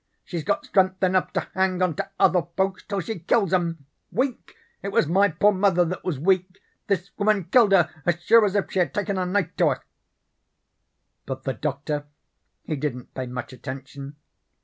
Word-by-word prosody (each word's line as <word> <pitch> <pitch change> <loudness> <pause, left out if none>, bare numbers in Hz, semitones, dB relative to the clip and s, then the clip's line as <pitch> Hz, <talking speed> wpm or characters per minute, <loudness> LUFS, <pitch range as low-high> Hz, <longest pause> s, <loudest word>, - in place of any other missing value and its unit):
She's 170 -3 -5
got - - -1
strength 190 -1 +2
enough 185 0 +2
to - - -1
hang 190 -1 +1
onto 180 -4 +1 0.2
other 180 -3 +4
folks 190 0 0
till 200 -2 -3
she 185 +2 -5
kills 195 +2 +1
'em. 165 -5 0 0.3
Weak? 255 0 -2 0.3
It - - -5
was - - +3
my 195 +6 +3
poor 200 +5 +3
mother 185 -3 +3
that 180 +2 -4
was 175 -6 -2
weak: 185 +4 +1 0.3
this 195 -1 -1
woman 205 -1 +2
killed 210 +4 +4
her 185 -4 +5 0.2
as 175 -1 +1
sure 225 +6 +5
as 205 -1 +1
if 200 - 0
she 190 - 0
had 175 - 0
taken 200 -2 -1
a 180 - -1
knife 190 -1 -1
to - - +4
her.' - - -1 1.4
"But 130 0 -5
the 135 - -1
Doctor 145 +5 -3 0.6
he 155 - -3
didn't 135 -4 -4
pay 130 -1 -4
much 125 +1 -6
attention. 135 +2 -8
185 Hz, 185 wpm, -24 LUFS, 155-195 Hz, 1.4 s, her